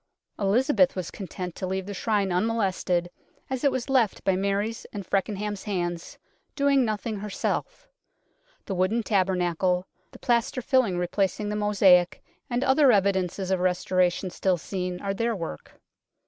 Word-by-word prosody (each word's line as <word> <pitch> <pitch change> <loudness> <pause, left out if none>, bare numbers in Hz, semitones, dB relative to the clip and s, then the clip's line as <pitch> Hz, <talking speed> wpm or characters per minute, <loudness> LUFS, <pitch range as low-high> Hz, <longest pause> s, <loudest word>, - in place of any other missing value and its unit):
Elizabeth 265 +7 +3
was 185 -3 -4
content 180 -2 -6
to 185 - -5
leave 190 0 -2
the 205 - -6
Shrine 200 -1 0
unmolested 185 -3 0 0.4
as 260 0 -2
it 280 - +4
was 255 -2 -3
left 255 -6 +1
by 190 - +2
Mary's 200 +4 -1
and 200 -3 -6
Fecken 195 +2 -1
ham's 205 -1 -4
hands, 175 -4 -3 0.4
doing 280 -2 +3
nothing 215 -1 -2
herself; 210 - -3 0.8
the 195 - -3
wooden 190 +6 +1
tabernacle, 180 -2 +1 0.2
the - - -14
plaster 240 +1 0
filling 235 -9 +2
replacing 195 +3 -1
the 210 - -2
mosaic, 195 -4 +4 0.3
and 245 +1 0
other 270 0 +5
evidences 190 -2 +1
of 190 - +2
restoration 180 0 +1
still 185 0 +1
seen 180 +1 -4
are 195 0 -2
their 230 +3 -1
work. 165 - -7
195 Hz, 145 wpm, -26 LUFS, 185-225 Hz, 0.8 s, other